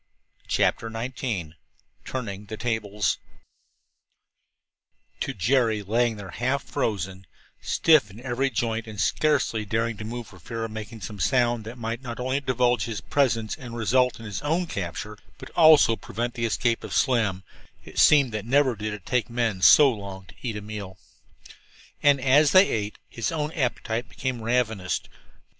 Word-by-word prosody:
CHAPTER 115 - +1
XIX 115 -7 -4 0.5
TURNING 105 -5 -5
THE 110 - -6
TABLES 105 -3 -1 2.0
To - - -2
Jerry, 115 0 +2
lying 115 +3 +1
there 100 -3 -9
half 130 +3 -1
frozen, 95 -9 -3 0.3
stiff 155 -10 +4
in 100 +3 -13
every 130 +2 -1
joint 115 -3 -2
and 105 -2 -8
scarcely 140 -8 +1
daring 110 +2 -1
to 105 - -7
move 120 +2 -5
for 95 -4 -15
fear 115 +7 -5
of 115 - -7
making 110 0 -7
some 105 -1 -7
sound 120 -3 +1
that 115 +3 -8
might 115 +1 -4
not 120 -2 -7
only 130 +2 0
divulge 125 -2 +1
his 110 -4 -4
presence 115 -5 0
and 120 -2 -9
result 125 +3 +2
in 115 - -9
his 100 -3 -5
own 165 +5 0
capture, 100 - -5 0.2
but - - -11
also 155 -8 +6
prevent 120 +3 -4
the 115 -1 -2
escape 115 +1 0
of - - -5
Slim, 110 -8 +1 0.4
it - - -5
seemed 140 -5 +6
that 110 -2 -3
never 130 +1 +3
did 105 0 -4
it 100 - -13
take 125 -3 0
men 115 -5 -1
so 140 +7 +8
long 100 -4 -7
to - - -16
eat 115 -4 -3
a - - -5
meal. 100 -3 -7 1.0
And 145 -2 +5
as 140 +3 +4
they 185 +1 +8
ate, 105 -1 -2
his 115 -2 -3
own 155 -2 -2
appetite 120 -4 -2
became 130 -3 -4
ravenous. 110 -5 0
115 Hz, 160 wpm, -25 LUFS, 105-130 Hz, 2.0 s, so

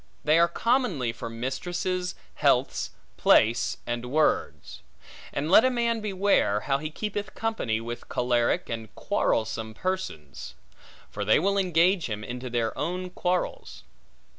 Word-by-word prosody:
They 155 +2 +4
are 170 - +6
commonly 180 - 0
for 115 - -6
mistresses, 175 +10 -3 0.2
healths, - - +1 0.3
place, 115 +2 +4
and 120 +1 -3
words. 155 +3 0 0.5
And 150 +4 -2
let 215 - +8
a 255 - +4
man 235 -2 0
beware, 195 - +2
how 135 -1 0
he 155 +1 -4
keepeth 205 +3 -4
company 220 - -1
with 120 +1 -7
choleric 120 -1 +1
and 115 -2 -6
quarrelsome 110 0 -1
persons; 115 - -4 0.6
for 105 - -4
they 105 - +4
will 200 +5 +1
engage 180 0 +3
him 105 -1 -4
into 125 +2 -6
their 115 -2 -1
own 180 +3 -3
quarrels. 180 0 -2
155 Hz, 135 wpm, -27 LUFS, 115-185 Hz, 0.6 s, let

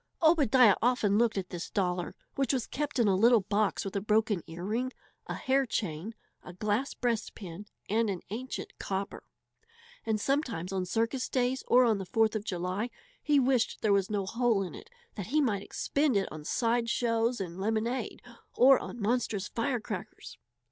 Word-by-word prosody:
Obadiah 265 - +6
often 220 -4 +2
looked 230 -3 +2
at 185 -2 -4
this 175 -1 -5
dollar, 180 -3 -1 0.2
which 275 -1 0
was 255 -4 0
kept 295 0 -3
in 235 -3 +3
a 195 - +4
little 230 +3 +5
box 205 +1 0
with 195 - -5
a 200 - 0
broken 215 -2 +1
earring, 210 +10 -3 0.4
a - - -3
hair 270 +1 +2
chain, 200 0 -3 0.3
a 180 - -10
glass 215 +8 -1
breastpin, 210 -5 -3 0.2
and 220 +1 +1
an 185 -3 -3
ancient 255 +5 -5
"copper"; 195 +1 -3 0.8
and 220 -1 0
sometimes 230 - -1
on 185 -1 -1
circus 230 +7 -1
days 255 0 0
or 250 +1 +6
on 220 -4 +2
the 190 - -4
Fourth 220 +3 +2
of 215 - -2
July 185 +4 -2 0.3
he 295 -1 +3
wished 255 -3 +1
there 210 -2 +4
was 195 -1 +2
no 205 -2 -1
hole 230 -1 +1
in 180 - -6
it 440 - -11 0.2
that 200 -4 -6
he 300 +6 +2
might 220 -9 +1
expend 280 +3 0
it 195 - 0
on 155 -1 -8
side 230 +6 0
shows 230 0 +1
and 180 -2 -5
lemonade 225 +4 -2 0.3
or 265 +1 +7
on - - -7
monstrous 215 -2 -1
firecrackers. 230 -5 -4
220 Hz, 175 wpm, -30 LUFS, 195-245 Hz, 0.8 s, or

